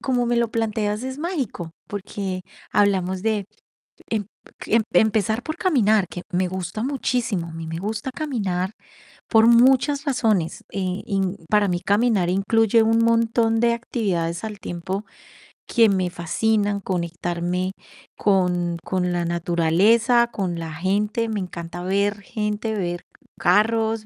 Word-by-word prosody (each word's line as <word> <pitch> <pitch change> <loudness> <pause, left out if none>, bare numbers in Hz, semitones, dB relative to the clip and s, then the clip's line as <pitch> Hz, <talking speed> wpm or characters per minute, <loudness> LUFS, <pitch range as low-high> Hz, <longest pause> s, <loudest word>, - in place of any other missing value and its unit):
como 250 -2 0
me 240 - +1
lo 235 -1 +2
planteas, 215 -1 -1
es 260 +1 -5
mágico, 270 - -3
porque 195 -2 -4 0.3
hablamos 190 -2 +2
de 215 -3 0 0.7
em, 215 -2 -1 0.3
cl 225 +1 +2
empezar 220 +3 +2
por 315 +5 -5
caminar, 220 - +3
que 175 - -6
me 185 +1 +1
gusta 185 +4 -4
muchísimo, 245 -9 -1
a - - -9
mí 165 0 -6
me 165 - -4
gusta 220 +6 -3
caminar 200 -11 -2 0.6
por 225 0 +6
muchas 265 +4 +5
razones. 220 - 0
Eh, 185 0 -3
en 195 -2 -1
para 210 -1 +3
mí 175 0 0
caminar 205 -2 +2
incluye 220 +4 +3
un 225 +1 +3
montón 230 0 +2
de 235 0 +4
actividades 185 -8 -2
al 215 -2 -5
tiempo 190 +3 -4 0.6
que 230 -3 +4
me 185 -2 +1
fascinan, 205 +4 0
conectarme 175 0 -2 0.5
con 180 -3 +1
con 180 -1 -1
la 175 -1 -1
naturaleza, 180 +8 +3
con 180 -6 -3
la 165 -1 -5
gente. 205 +7 0
Me 215 -2 -2
encanta 175 -1 -6
ver 200 +2 0
gente, 210 +1 -3
ver 175 -3 -2 0.4
carros, 220 +3 +2
205 Hz, 135 wpm, -23 LUFS, 180-225 Hz, 0.7 s, por